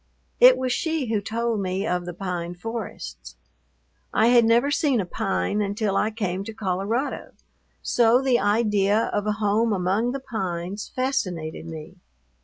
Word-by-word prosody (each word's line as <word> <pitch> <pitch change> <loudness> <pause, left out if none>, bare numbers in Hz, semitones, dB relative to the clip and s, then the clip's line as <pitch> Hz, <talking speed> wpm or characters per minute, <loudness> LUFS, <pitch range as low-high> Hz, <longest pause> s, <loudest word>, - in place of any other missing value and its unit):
It - - +8
was 260 -1 -1
she 310 -6 -1
who 210 - +1
told 230 +1 -1
me 190 +1 -2
of 180 -4 -1
the 175 - -4
pine 175 -2 -4
forests. 180 - -7 0.8
I 225 +2 +3
had 240 -1 +6
never 235 +5 +3
seen 285 -4 +2
a 195 - -1
pine 195 +3 -1
until 205 0 -1
I 215 - +2
came 195 -4 -3
to 225 - -6
Colorado; 215 +6 -2 0.5
so 240 0 +4
the 260 -2 +2
idea 210 0 +2
of 205 0 -1
a 210 - +2
home 215 +2 +1
among 200 +5 +1
the 275 - -3
pines 190 -5 -4
fascinated 185 - -2
me. 160 +3 -9
210 Hz, 155 wpm, -24 LUFS, 185-235 Hz, 0.8 s, It